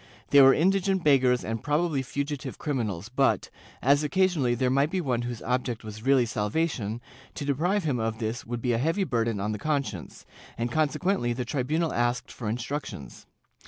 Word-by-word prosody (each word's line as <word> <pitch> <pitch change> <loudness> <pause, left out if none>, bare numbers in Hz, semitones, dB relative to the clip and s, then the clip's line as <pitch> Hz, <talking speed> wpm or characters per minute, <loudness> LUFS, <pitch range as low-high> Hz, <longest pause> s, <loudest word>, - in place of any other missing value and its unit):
They 140 - +8
were 135 0 +9
indi 190 +5 +3
gent 190 -1 0
beggars 130 -4 +3
and 110 0 -3
probably 150 -1 0
fugitive 140 +1 -4
criminals 110 - -3
but, 135 +4 +1 0.3
as 140 +3 +4
occasionally 155 -7 +2
there 125 +1 +1
might 140 +3 +3
be 185 - -1
one 130 -8 0
whose 120 -1 -5
object 125 -1 -2
was 110 0 -8
really 130 0 +4
salvation, 110 0 -1 0.4
to 145 - -4
deprive 175 +8 +1
him 140 -6 0
of 110 0 -2
this 110 +1 -3
would 120 0 -5
be 125 - +1
a 115 - +1
heavy 165 +9 +1
burden 115 - 0
on 105 +2 -1
the 105 - -4
conscience, 140 - -3 0.3
and 120 +1 -2
con 155 -2 +2
sequently 135 -8 0
the 125 0 -3
tribunal 150 +6 -1
asked 120 0 0
for 110 -4 -5
instructions. 120 - -5
130 Hz, 185 wpm, -27 LUFS, 115-150 Hz, 0.4 s, were